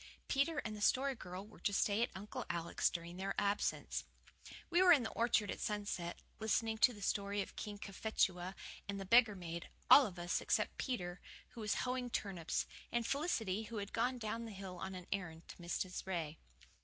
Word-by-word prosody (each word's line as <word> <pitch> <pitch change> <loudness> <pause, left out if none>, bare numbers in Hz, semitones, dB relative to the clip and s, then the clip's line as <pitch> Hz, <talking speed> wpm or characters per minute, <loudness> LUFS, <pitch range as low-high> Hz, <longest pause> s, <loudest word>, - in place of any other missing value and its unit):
Peter 295 +3 +2
and 215 -1 -3
the 210 - -7
Story 270 +6 +3
Girl 185 -4 -7
were 215 - -15
to - - +1
stay 205 +2 +2
at 240 - +2
Uncle 210 +6 -5
Alec's 170 0 +1
during 170 +1 -5
their 195 +1 -2
absence. 205 0 0 0.7
We 350 +2 +5
were 370 -1 +8
in 290 -7 +7
the 220 - -3
orchard 225 -3 +2
at - - -5
sunset, 205 -5 -3 0.2
listening 220 0 +1
to 250 - +7
the 205 -4 -9
story 200 0 0
of - - -13
King 210 -1 -5
Cophetua 190 -2 0 0.3
and 200 0 -2
the 195 - -4
beggar 230 0 +6
maid 170 -2 -6 0.2
all 280 - +11
of 185 -3 -9
us, 175 0 0
except - - +1
Peter, 180 -9 -2 0.3
who 235 - -9
was 210 -1 +1
hoeing 250 0 -1
turnips, 190 -8 -1 0.3
and 235 -1 +1
Felicity, 225 - 0
who 230 0 -6
had 200 -1 -4
gone 250 +3 +1
down 230 0 -3
the 225 - -6
hill 190 -2 -7
on 190 +1 -4
an 180 -1 -7
errand 170 -4 -3
to - - -9
Mrs. 180 +2 -3
Ray. 165 -4 -2
205 Hz, 195 wpm, -37 LUFS, 185-230 Hz, 0.7 s, all